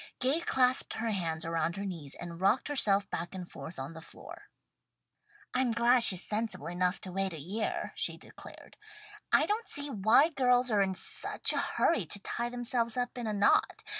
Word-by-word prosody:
Gay 265 +6 +2
clasped 255 -6 +2
her 225 0 -2
hands 165 -5 -3
around 165 +1 -1
her 200 - -4
knees 165 -8 -6
and 170 0 -9
rocked 215 +9 +2
herself 205 -8 +2
back 170 +3 -4
and 180 -2 -8
forth 170 - -9
on 135 +4 -6
the 160 - -10
floor. - - -12 1.0
"I'm 255 -1 +1
glad 235 +2 +3
she's 190 -5 +6
sensible 220 +1 -2
enough 180 +2 -1
to 185 - -7
wait 195 0 -2
a 160 - -7
year," 200 +9 -3
she - - -2
declared. - - -14 0.5
"I - - +5
don't 435 +3 -2
see 285 0 0
why 220 - +4
girls 250 -4 +2
are 205 -2 +3
in 190 -1 0
such 185 - 0
a - - 0
hurry 220 - +1
to 200 - -3
tie 235 +4 -3
themselves 240 -1 -1
up 245 0 -2
in 240 -2 -5
a 215 - -2
knot. 205 0 +2
210 Hz, 190 wpm, -30 LUFS, 180-245 Hz, 1.0 s, she's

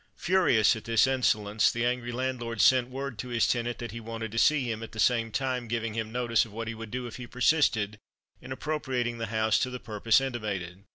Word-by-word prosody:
Furious 175 - +3
at 110 - -9
this 115 0 +4
insolence, 110 -5 +2
the 120 0 -1
angry 120 0 -1
landlord 120 -2 -3
sent 125 +3 +5
word 135 -3 -5
to 125 - -5
his 120 -2 +1
tenant 120 0 -1
that 120 -3 -6
he 115 - -6
wanted 115 -1 -6
to 115 - -1
see 150 0 +4
him, 115 -2 -3
at 115 - -8
the 110 - -8
same 115 -1 +2
time 130 -1 -2
giving 115 -1 -2
him 110 0 -3
notice 120 -2 +2
of 110 - -10
what 115 +2 -5
he 115 - -3
would 115 0 -8
do 125 +2 -4
if 120 - -7
he 125 -1 -8
persisted 120 -6 +1 0.4
in - - -10
appropriating 130 -6 -2
the 115 - -3
house 110 0 +1
to 130 - 0
the 125 0 -6
purpose 110 0 +2
intimated. 100 -8 -4
115 Hz, 225 wpm, -28 LUFS, 110-125 Hz, 0.4 s, sent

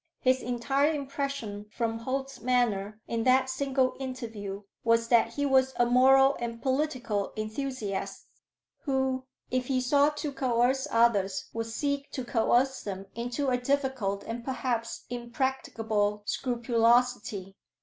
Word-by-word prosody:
His 260 0 +2
entire 270 +5 +1
impression 275 -8 -4
from 225 0 -2
Holt's 265 +2 -4
manner 220 -4 +1
in 230 -1 -1
that 260 0 +4
single 265 -1 +1
interview 225 -7 -5 0.2
was 230 0 +2
that 230 -1 +4
he 285 - 0
was 265 -1 +3
a 240 - +3
moral 270 +3 +6
and 235 -1 -4
political 255 -6 -1
enthusiast, 215 -2 -4 0.5
who, 265 -2 -1 0.3
if 255 0 0
he 265 -2 +1
sought 285 +4 +3
to 295 -1 -3
coerce 260 +1 +1
others, 205 -6 +2
would 225 0 -3
seek 280 +4 -2
to 260 -3 -4
coerce 245 +3 +2
them 195 -1 -5
into 245 +4 -2
a 250 - +2
difficult, 260 -7 -1
and 235 +1 -5
perhaps 245 -3 -3
impracticable, 230 -4 -1
scrupulosity. 235 -5 +1
245 Hz, 130 wpm, -29 LUFS, 225-265 Hz, 0.5 s, moral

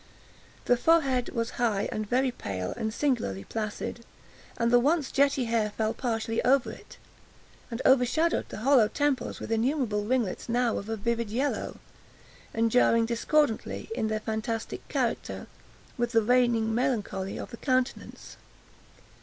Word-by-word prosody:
The 245 - +4
forehead 270 -4 +2
was 230 -1 -2
high, 210 -4 +1
and 215 -1 -4
very 255 +1 +2
pale, 95 - -4
and 220 -2 -2
singularly 225 - -1
placid; 220 - -4 0.5
and 235 0 +1
the 245 - +6
once 290 +3 +1
jetty 275 -2 +2
hair 225 -2 +1
fell 220 +1 -1
partially 225 -2 -2
over 265 0 +3
it, - - -13 0.7
and 230 +1 -4
overshadowed 265 +6 +3
the - - -7
hollow 265 -6 +6
temples 285 +2 -1
with - - -6
innumerable 225 -2 0
ringlets, 235 -2 -1
now 240 0 +1
of 205 - -9
a 225 - -1
vivid 235 +1 -1
yellow, 265 +6 -2 0.7
and 225 0 +1
jarring 230 -1 +4
discordantly, 235 - 0
in 220 - -1
their 215 0 -2
fantastic 220 +1 -4
character, - - -2 0.5
with 240 0 0
the 225 -1 +4
reigning 235 -1 +3
melancholy 210 -6 -1
of - - -7
the 235 - -8
countenance. 255 -1 -2
235 Hz, 145 wpm, -28 LUFS, 220-255 Hz, 0.7 s, the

